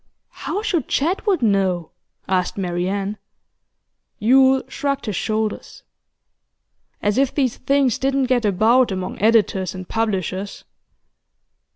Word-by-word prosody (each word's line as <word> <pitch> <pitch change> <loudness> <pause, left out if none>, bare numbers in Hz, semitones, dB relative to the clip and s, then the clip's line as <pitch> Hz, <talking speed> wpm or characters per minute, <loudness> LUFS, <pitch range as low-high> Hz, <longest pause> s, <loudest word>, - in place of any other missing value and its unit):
'How 410 +3 -5
should 350 - -1
Jedwood 365 - 0
know?' 190 -5 +1 0.4
asked 185 0 0
Marian. 195 +3 -2 1.0
Yule 265 +4 +4
shrugged 280 -1 -3
his 210 -4 -3
shoulders. 215 +2 -3 1.2
'As 205 +4 +1
if 275 -1 +1
these 260 -5 0
things 275 -2 +1
didn't 270 0 +1
get 250 -2 +1
about 220 +5 +3
among 185 -1 -5
editors 200 -4 +2
and 185 -1 -8
publishers! 200 -3 -3
220 Hz, 105 wpm, -21 LUFS, 195-265 Hz, 1.2 s, Yule